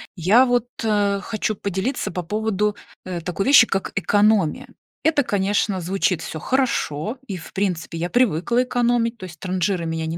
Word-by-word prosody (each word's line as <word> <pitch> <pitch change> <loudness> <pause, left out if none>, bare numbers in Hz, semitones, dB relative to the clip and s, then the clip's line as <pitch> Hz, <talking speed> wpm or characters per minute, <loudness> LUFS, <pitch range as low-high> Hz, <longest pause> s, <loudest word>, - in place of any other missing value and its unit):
Я 200 +9 +5
вот, 245 -1 0 0.2
а, 205 -2 +1
хочу 215 +1 -2
поделиться 200 +8 -2
по 180 0 -4
поводу, 210 +1 -1 0.3
э, 180 -2 -4
такой 180 +5 -3
вещи, 275 -5 +8
как 195 - -2
экономия. 205 -4 +2 0.4
Это, 305 -3 +3
конечно, 200 -2 0
звучит 180 -1 0
всё 160 - -6
хорошо, 230 - -1
и, 195 - -4
в 170 - -10
принципе, 180 -4 -2
я 170 +2 -2
привыкла 240 +1 +2
экономить, 240 -2 0
то 190 - -8
есть 175 -1 -11
транжирой 185 -1 -1
меня 160 0 -3
не 160 +1 -3
200 Hz, 165 wpm, -22 LUFS, 180-230 Hz, 0.4 s, вещи